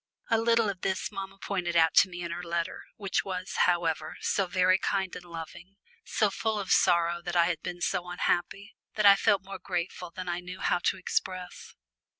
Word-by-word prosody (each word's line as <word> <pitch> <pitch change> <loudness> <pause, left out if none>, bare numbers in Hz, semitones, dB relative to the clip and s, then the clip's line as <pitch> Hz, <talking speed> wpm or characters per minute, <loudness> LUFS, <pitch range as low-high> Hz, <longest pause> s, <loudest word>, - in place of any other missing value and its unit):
A 225 - +4
little 230 -1 +3
of 195 -3 -4
this 190 +2 -1
mamma 195 -1 -7
pointed 180 -3 -3
out 160 -1 +5
to 195 - +7
me 175 -1 -6
in 170 - -4
her 175 - -4
letter, 170 -1 -3
which 195 -3 -1
was, 185 -1 -5 0.2
however, 165 -3 -1
so 195 -2 0
very 185 +1 +3
kind 190 -2 -1
and 180 - -8
loving, 170 +2 -9 0.3
so - - +1
full 220 -1 -1
of 200 -2 -3
sorrow 170 -1 +3
that 175 0 -5
I 170 -1 +5
had 170 -2 -1
been 175 -1 -6
so 180 0 -1
unhappy, 180 +3 -1 0.2
that 210 - +1
I 200 0 +10
felt 195 0 +2
more 195 0 -8
grateful 180 0 -4
than 185 +1 -7
I 175 0 -1
knew 180 +1 -9
how 175 - +1
to - - +2
express. 185 0 -4
180 Hz, 200 wpm, -28 LUFS, 175-195 Hz, 0.3 s, I